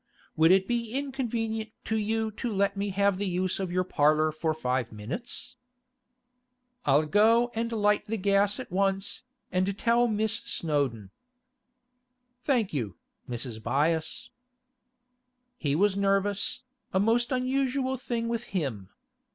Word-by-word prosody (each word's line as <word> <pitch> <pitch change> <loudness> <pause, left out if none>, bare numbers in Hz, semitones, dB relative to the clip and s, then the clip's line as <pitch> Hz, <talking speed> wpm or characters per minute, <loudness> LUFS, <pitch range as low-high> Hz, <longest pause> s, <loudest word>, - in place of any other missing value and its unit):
Would 160 +1 +5
it 190 +1 +5
be 235 -2 -1
inconvenient 235 -5 -2 0.2
to 220 - -1
you 220 +1 0
to 235 +3 -4
let 200 0 +1
me 200 +1 -2
have 200 0 +2
the 205 - -1
use 185 +1 -1
of 190 -2 -2
your 185 +1 +1
parlour 155 -2 +3
for 155 +1 -1
five 130 -5 -1
minutes?' 175 - -6 1.3
'I'll 145 +2 +4
go 225 +7 +4
and 230 +1 -2
light 210 -1 +2
the 225 +1 -1
gas 200 +2 +2
at 255 - -7
once, 195 +3 0 0.3
and 185 +2 0
tell 235 +2 +3
Miss 220 0 0
Snowdon.' 135 - -2 1.3
'Thank 240 - +1
you, 110 - -2 0.3
Mrs. 120 -2 -5
Byass.' 155 +7 0 1.3
He 145 -2 0
was 200 +3 +3
nervous, 200 +4 +1 0.3
a 190 - +2
most 230 +5 +2
unusual 260 +1 0
thing 235 -2 -3
with 235 0 -2
him. 115 - -3
200 Hz, 135 wpm, -28 LUFS, 160-230 Hz, 1.3 s, Would